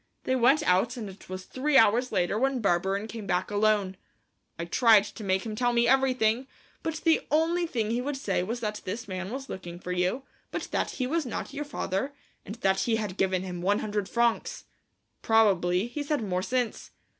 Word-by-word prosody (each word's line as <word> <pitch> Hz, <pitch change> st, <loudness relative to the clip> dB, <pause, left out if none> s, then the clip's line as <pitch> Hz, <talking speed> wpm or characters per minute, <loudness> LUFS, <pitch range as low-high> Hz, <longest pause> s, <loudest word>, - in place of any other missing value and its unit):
They 260 Hz, -, +1 dB
went 265 Hz, +5 st, +4 dB
out 230 Hz, +4 st, +2 dB
and 220 Hz, -3 st, -5 dB
it 195 Hz, 0 st, -12 dB
was 185 Hz, 0 st, -6 dB
three 275 Hz, +2 st, +1 dB
hours 235 Hz, +4 st, +4 dB
later 190 Hz, +1 st, +1 dB
when 270 Hz, 0 st, +1 dB
Barberin 195 Hz, 0 st, +1 dB
came 225 Hz, -2 st, -7 dB
back 180 Hz, -, 0 dB
alone. 205 Hz, -2 st, +1 dB, 0.6 s
I 170 Hz, -, -4 dB
tried 220 Hz, +3 st, +5 dB
to 210 Hz, +1 st, -9 dB
make 190 Hz, 0 st, 0 dB
him 215 Hz, -1 st, -4 dB
tell 245 Hz, +2 st, +1 dB
me 235 Hz, 0 st, +3 dB
everything, 255 Hz, -2 st, +2 dB, 0.3 s
but 320 Hz, -, -3 dB
the 325 Hz, -1 st, +2 dB
only 330 Hz, +3 st, +2 dB
thing 225 Hz, -7 st, -1 dB
he 240 Hz, +2 st, 0 dB
would 280 Hz, +2 st, -3 dB
say 200 Hz, -9 st, -1 dB
was 230 Hz, +6 st, -3 dB
that 210 Hz, -1 st, -3 dB
this 225 Hz, +6 st, -5 dB
man 185 Hz, -1 st, -4 dB
was 270 Hz, +3 st, -6 dB
looking 175 Hz, -5 st, -7 dB
for 180 Hz, -, -6 dB
you, 180 Hz, +9 st, 0 dB, 0.3 s
but -, -, -4 dB
that -, -, 0 dB
he 255 Hz, -, 0 dB
was 310 Hz, +1 st, -1 dB
not 245 Hz, -, -5 dB
your 295 Hz, +1 st, -4 dB
father, 275 Hz, 0 st, -3 dB, 0.3 s
and 205 Hz, -, -7 dB
that 190 Hz, 0 st, +3 dB
he 230 Hz, -, +1 dB
had 210 Hz, -4 st, -3 dB
given 190 Hz, -2 st, 0 dB
him 180 Hz, -2 st, -5 dB
one 200 Hz, +3 st, +2 dB
hundred 205 Hz, -2 st, -2 dB
francs. 235 Hz, -1 st, 0 dB, 0.6 s
Probably 195 Hz, -4 st, +3 dB
he's 285 Hz, +4 st, -5 dB
had 295 Hz, -7 st, +1 dB
more 180 Hz, -3 st, -1 dB
since. 245 Hz, +2 st, -2 dB
220 Hz, 200 wpm, -28 LUFS, 190-255 Hz, 0.6 s, tried